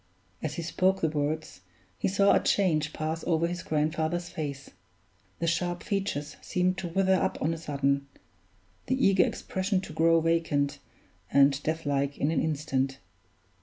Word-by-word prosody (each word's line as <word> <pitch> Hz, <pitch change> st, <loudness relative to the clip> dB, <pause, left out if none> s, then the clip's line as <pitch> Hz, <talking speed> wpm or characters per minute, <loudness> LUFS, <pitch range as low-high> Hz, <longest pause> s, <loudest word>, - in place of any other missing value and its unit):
As 150 Hz, -1 st, -3 dB
he 170 Hz, -, -4 dB
spoke 185 Hz, +3 st, +1 dB
the 160 Hz, -, +2 dB
words, 150 Hz, -, -3 dB, 0.4 s
he -, -, +1 dB
saw 200 Hz, +1 st, +4 dB
a -, -, +5 dB
change 155 Hz, -6 st, +1 dB
pass 160 Hz, +1 st, -3 dB
over 165 Hz, -1 st, +2 dB
his 175 Hz, +1 st, -3 dB
grandfather's 160 Hz, +3 st, -1 dB
face 145 Hz, -5 st, -5 dB, 0.7 s
the -, -, -2 dB
sharp 175 Hz, +1 st, -1 dB
features 190 Hz, -8 st, -2 dB
seemed 185 Hz, 0 st, 0 dB
to 185 Hz, -, -3 dB
wither 190 Hz, +2 st, +2 dB
up 185 Hz, -, +1 dB
on 160 Hz, +2 st, 0 dB
a -, -, -4 dB
sudden; 140 Hz, -2 st, 0 dB, 0.8 s
the 260 Hz, -, +2 dB
eager 190 Hz, -2 st, +5 dB
expression 190 Hz, +1 st, -1 dB
to 175 Hz, -, -9 dB
grow 165 Hz, +1 st, +4 dB
vacant 160 Hz, -4 st, +1 dB, 0.5 s
and 140 Hz, 0 st, +4 dB
death 160 Hz, +1 st, -2 dB
like 140 Hz, 0 st, 0 dB
in 145 Hz, -, +1 dB
an 165 Hz, -, +1 dB
instant. 135 Hz, -3 st, -1 dB
160 Hz, 160 wpm, -28 LUFS, 145-175 Hz, 0.8 s, a